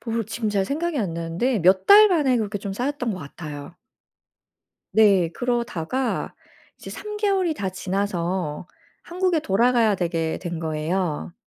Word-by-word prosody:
모르 230 Hz, -1 st, -2 dB
지금 220 Hz, +1 st, -3 dB
잘 200 Hz, -2 st, +1 dB
생각이 310 Hz, -, -2 dB
안 190 Hz, -8 st, -2 dB
나는데 170 Hz, +9 st, -1 dB
몇 185 Hz, +2 st, +4 dB
달 425 Hz, +1 st, +9 dB
만에 295 Hz, -9 st, +2 dB
그렇게 210 Hz, -2 st, -2 dB
좀 200 Hz, 0 st, -5 dB
쌓였던 245 Hz, +1 st, -2 dB
것 185 Hz, -, -6 dB
같아요. 150 Hz, +1 st, -9 dB, 1.2 s
네. 200 Hz, -6 st, +4 dB
그러다가 240 Hz, 0 st, -2 dB, 0.4 s
이제 -, -, -10 dB
3 420 Hz, 0 st, -7 dB
개월이 390 Hz, -5 st, +1 dB
다 195 Hz, -8 st, -3 dB
지나서 185 Hz, -4 st, -3 dB, 0.4 s
한국에 360 Hz, -1 st, 0 dB
돌아가야 230 Hz, -1 st, +2 dB
되게 165 Hz, -3 st, -2 dB
된 170 Hz, -2 st, -5 dB
거예요. 160 Hz, +1 st, -2 dB
205 Hz, 285 characters per minute, -23 LUFS, 175-255 Hz, 1.2 s, 달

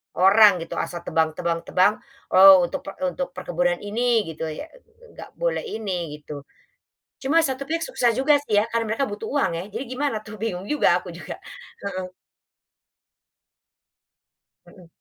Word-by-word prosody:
orang 205 Hz, +3 st, +7 dB
gitu -, -, -6 dB
asal 175 Hz, -1 st, -4 dB
tebang 160 Hz, -2 st, 0 dB
tebang 170 Hz, -1 st, -1 dB
tebang 185 Hz, +3 st, +4 dB, 0.4 s
oh 190 Hz, -1 st, +9 dB
untuk 175 Hz, -, -3 dB
pe -, -, -4 dB
untuk 270 Hz, 0 st, -2 dB
perkebunan 175 Hz, -1 st, 0 dB
ini 230 Hz, +2 st, +1 dB
gitu 160 Hz, 0 st, -5 dB
ya, 155 Hz, -, -6 dB, 0.5 s
nggak -, -, -11 dB
boleh -, -, -1 dB, 0.2 s
ini 180 Hz, -8 st, -4 dB
gitu, 150 Hz, -1 st, -9 dB, 0.8 s
cuma 295 Hz, +5 st, +3 dB
satu 275 Hz, -4 st, -2 dB
pihak 330 Hz, +3 st, -2 dB
susah 245 Hz, -, +2 dB
juga 270 Hz, +5 st, +3 dB
sih 210 Hz, -6 st, +3 dB
ya -, -, 0 dB
karena 230 Hz, 0 st, -1 dB
mereka 275 Hz, +5 st, 0 dB
butuh 210 Hz, +2 st, -6 dB
uang 280 Hz, -9 st, +1 dB
ya 170 Hz, -, -4 dB
jadi 230 Hz, +6 st, -4 dB
gimana 255 Hz, -4 st, -1 dB
tuh? 215 Hz, 0 st, -9 dB
Bingung 200 Hz, -3 st, -4 dB
juga 300 Hz, -, +2 dB
aku -, -, -12 dB
juga, -, -, -8 dB, 0.4 s
heeh. 185 Hz, -2 st, -5 dB, 2.5 s
Mhm. 180 Hz, -4 st, -17 dB
205 Hz, 155 wpm, -23 LUFS, 180-255 Hz, 2.5 s, oh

